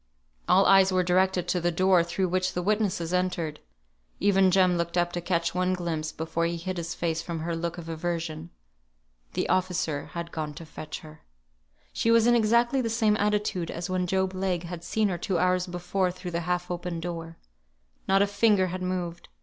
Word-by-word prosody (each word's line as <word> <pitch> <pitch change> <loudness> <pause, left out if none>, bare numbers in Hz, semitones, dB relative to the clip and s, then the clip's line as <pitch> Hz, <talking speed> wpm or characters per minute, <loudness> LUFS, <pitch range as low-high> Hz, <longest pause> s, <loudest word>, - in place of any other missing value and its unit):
All 195 +2 +6
eyes 195 -1 +6
were 185 -1 +2
directed 185 0 +2
to 180 - +1
the 175 +1 +1
door 185 0 +4
through 180 +2 -1
which 185 +1 0
the 180 - -2
witnesses 195 -4 0
entered. 175 -4 -1 0.6
Even 195 -1 +4
Jem 185 -1 +4
looked 170 +1 -2
up 175 0 +2
to 175 - -2
catch 170 -1 0
one 185 +1 +1
glimpse 160 -3 -3
before 165 +1 -2
he 170 0 -3
hid 185 +2 -4
his 170 -1 -4
face 165 -1 -1
from 165 -1 -5
her 170 +1 -2
look 170 +1 -3
of 170 -2 -8
aversion. 165 -1 -4 0.8
The - - -1
officer 180 -5 0
had 170 0 -5
gone 155 -2 -4
to 165 - -9
fetch 155 0 -8
her. 155 -1 -13 0.7
She 230 - 0
was 230 -1 +5
in 240 - +5
exactly 235 +3 +3
the 230 - -1
same 220 -2 +2
attitude 205 -5 0
as 175 +2 -4
when 180 -1 0
Job 190 +1 0
Legh 185 -2 -1
had 170 -1 -7
seen 215 +4 +1
her 175 -2 -3
two 185 0 -1
hours 180 +1 +2
before 180 +1 -1
through 180 0 -7
the 170 - -1
half 180 0 -1
open 175 -1 -3
door. 165 -1 -6 0.7
Not 195 +1 +4
a - - +3
finger 200 -1 +3
had 185 - -4
moved. 180 -2 -4
180 Hz, 200 wpm, -27 LUFS, 170-190 Hz, 0.8 s, All